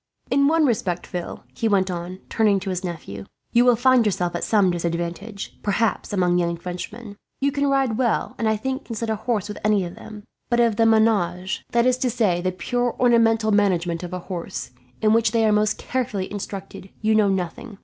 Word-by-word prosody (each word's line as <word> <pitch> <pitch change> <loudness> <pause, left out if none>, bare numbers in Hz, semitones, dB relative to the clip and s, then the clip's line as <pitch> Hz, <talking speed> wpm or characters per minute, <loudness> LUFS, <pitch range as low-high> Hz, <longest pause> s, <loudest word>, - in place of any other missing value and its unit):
"In 280 +1 +4
one 320 0 +3
respect, 190 -8 -1
Phil," 175 -2 -6
he 225 - -1
went 195 -3 +2
on, 180 +2 -6
turning 210 -3 +2
to 190 0 -3
his 185 +1 -3
nephew, 100 - -6 0.3
"you 240 0 +5
will 245 -1 +5
find 255 +1 +4
yourself 180 -4 0
at 175 - -3
some 200 -4 +3
disadvantage, 175 +4 -4
perhaps, 210 +2 0
among 180 -3 +2
young 170 -1 0
Frenchmen. 200 +5 -7 0.2
You 280 +1 +1
can 285 0 0
ride 265 -4 +1
well, 240 -4 0
and 225 - +1
I 220 - +2
think 265 +5 -4
can 230 - -6
sit 225 +1 -2
a - - +1
horse 215 -1 -2
with 210 - -7
any 210 -3 +2
of 170 - -7
them; 215 0 -11 0.3
but 240 -1 +2
of 230 -3 +3
the 225 - +4
menage, 200 -5 +2
that 235 0 +3
is 255 0 +2
to 255 -1 +1
say, 210 -7 +1
the 185 +1 0
purely 245 +6 -1
ornamental 225 -2 +3
management 180 -5 +1
of 180 -1 -6
a 180 - -3
horse, 175 -7 -6 0.3
in 215 0 +5
which 225 -1 +2
they 225 -1 +3
are 215 - +4
most 210 0 +2
carefully 235 -7 -3
instructed, 195 -1 -7
you 220 0 +2
know 215 -2 +4
nothing. 195 +3 -3
210 Hz, 210 wpm, -23 LUFS, 180-230 Hz, 0.3 s, you